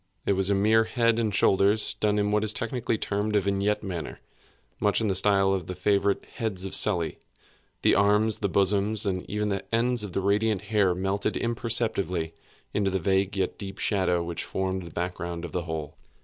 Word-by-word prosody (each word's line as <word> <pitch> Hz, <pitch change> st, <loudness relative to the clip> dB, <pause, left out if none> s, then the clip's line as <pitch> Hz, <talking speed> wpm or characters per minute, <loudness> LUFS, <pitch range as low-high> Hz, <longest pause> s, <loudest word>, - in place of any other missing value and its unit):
It -, -, +2 dB
was 95 Hz, 0 st, +1 dB
a 100 Hz, -, +3 dB
mere 110 Hz, +3 st, +3 dB
head 115 Hz, -1 st, +1 dB
and 110 Hz, -2 st, 0 dB
shoulders, 100 Hz, +2 st, +3 dB
done 105 Hz, -1 st, 0 dB
in 105 Hz, 0 st, +1 dB
what 105 Hz, 0 st, +2 dB
is 110 Hz, -1 st, +1 dB
technically 115 Hz, -1 st, -2 dB
termed 105 Hz, +1 st, -2 dB
a -, -, +5 dB
vignette 100 Hz, +2 st, 0 dB
manner; 85 Hz, -6 st, -5 dB, 0.6 s
much 105 Hz, -1 st, +2 dB
in 110 Hz, -2 st, 0 dB
the -, -, +2 dB
style 95 Hz, 0 st, +3 dB
of 95 Hz, -4 st, -3 dB
the 90 Hz, -, -5 dB
favorite 100 Hz, +1 st, +1 dB
heads 100 Hz, -5 st, -3 dB
of 95 Hz, -, -6 dB
Sully. 85 Hz, -6 st, +1 dB, 0.6 s
The -, -, +5 dB
arms, 105 Hz, +2 st, +3 dB
the 100 Hz, -, -1 dB
bosom, 100 Hz, +2 st, +1 dB
and 90 Hz, -2 st, -2 dB
even 105 Hz, 0 st, -1 dB
the 100 Hz, -1 st, -2 dB
ends 120 Hz, 0 st, +1 dB
of 100 Hz, -4 st, -7 dB
the 95 Hz, -, 0 dB
radiant 105 Hz, +1 st, +1 dB
hair 100 Hz, -4 st, +2 dB
melted 95 Hz, +2 st, -1 dB
imperceptibly 110 Hz, -8 st, -1 dB, 0.4 s
into 100 Hz, -2 st, +1 dB
the 95 Hz, -, 0 dB
vague 95 Hz, +2 st, 0 dB
yet 95 Hz, -1 st, -2 dB
deep 100 Hz, -1 st, -7 dB
shadow 95 Hz, -4 st, +1 dB
which 85 Hz, -1 st, -4 dB
formed 95 Hz, -1 st, -3 dB
the 85 Hz, -, -10 dB
back 90 Hz, +3 st, -3 dB
ground 85 Hz, -1 st, -5 dB
of 85 Hz, -, -8 dB
the 90 Hz, -2 st, -3 dB
whole. 80 Hz, -3 st, -5 dB
100 Hz, 200 wpm, -26 LUFS, 95-105 Hz, 0.6 s, a